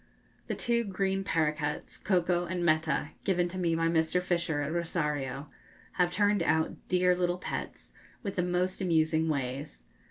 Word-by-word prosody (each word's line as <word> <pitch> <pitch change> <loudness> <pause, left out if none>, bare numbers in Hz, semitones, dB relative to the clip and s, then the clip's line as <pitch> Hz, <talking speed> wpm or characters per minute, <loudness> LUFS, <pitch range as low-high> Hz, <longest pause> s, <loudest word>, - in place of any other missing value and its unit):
The - - -2
two 235 0 +1
green 195 -1 -1
paroquets, 150 -4 -1
'Coco' 175 -2 +1
and 175 -1 -2
'Meta,' 155 -1 +2
given 180 -2 +2
to 185 +1 -5
me 170 -2 +1
by 165 0 +1
Mr. 165 +1 +2
Fisher 170 -4 0
at 150 +2 -3
Rosario, 150 -5 -2 0.4
have 180 -1 +1
turned 205 +1 +2
out 160 -1 +2
dear 180 0 +3
little 180 0 0
pets, - - -6 0.3
with 200 -3 -3
the 180 - +2
most 180 +1 0
amusing 160 -2 +2
ways. 130 - -3
175 Hz, 155 wpm, -30 LUFS, 155-180 Hz, 0.4 s, dear